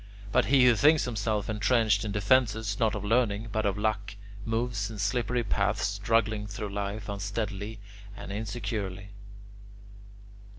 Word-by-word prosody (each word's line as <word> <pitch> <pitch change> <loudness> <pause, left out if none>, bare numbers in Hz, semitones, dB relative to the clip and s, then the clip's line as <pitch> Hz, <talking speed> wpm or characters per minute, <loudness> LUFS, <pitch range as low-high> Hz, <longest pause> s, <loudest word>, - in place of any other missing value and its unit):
But - - +3
he 135 -2 +5
who 120 -2 +6
thinks 150 +6 +4
himself 105 -3 -1
entrenched 110 -1 +2
in 105 - -3
defences 105 -1 +2
not 110 -2 +2
of 105 -1 -4
learning 110 -1 +1
but 110 0 0
of 100 - -1
luck, 105 -1 -1 0.3
moves 115 -2 -1
in 110 - -8
slippery 120 +4 0
paths, 105 0 0
struggling 105 +1 0
through 105 0 -5
life 100 +1 -4
unsteadily 100 +1 -4 0.4
and - - -7
insecurely." 100 -2 -4
105 Hz, 135 wpm, -28 LUFS, 100-115 Hz, 0.4 s, who